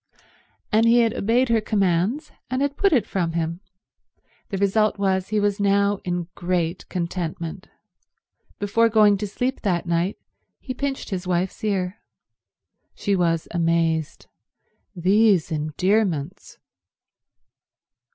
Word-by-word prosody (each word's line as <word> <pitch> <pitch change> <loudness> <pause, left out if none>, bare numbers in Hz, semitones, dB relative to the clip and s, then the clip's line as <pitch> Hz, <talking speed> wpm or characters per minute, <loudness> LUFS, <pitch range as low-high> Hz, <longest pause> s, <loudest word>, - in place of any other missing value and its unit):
And 225 +2 +4
he 235 +1 +6
had 230 -2 +2
obeyed 235 +5 +1
her 230 -1 +3
commands, 205 - 0 0.2
and 255 +2 0
had 285 0 -1
put 395 +4 +2
it 245 -10 +3
from 175 -6 -2
him. 165 0 -2 0.9
The 195 - -3
result 205 +2 +2
was 190 -1 0
he 215 0 +1
was 205 0 0
now 200 0 +2
in 175 -1 -2
great 175 -2 -2
contentment. 170 0 -4 0.9
Before 230 +3 +2
going 210 -2 +5
to 210 - -3
sleep 250 +6 -2
that 180 -5 0
night 170 +3 0 0.4
he 255 - -6
pinched 270 -2 -4
his 185 -1 -3
wife's 180 +2 -1
ear. 195 -2 -1 1.0
She 200 -2 0
was 165 -3 0
amazed. 165 -2 0 0.7
These 190 0 +3
endearments 160 +2 -1
195 Hz, 120 wpm, -23 LUFS, 175-215 Hz, 1.0 s, he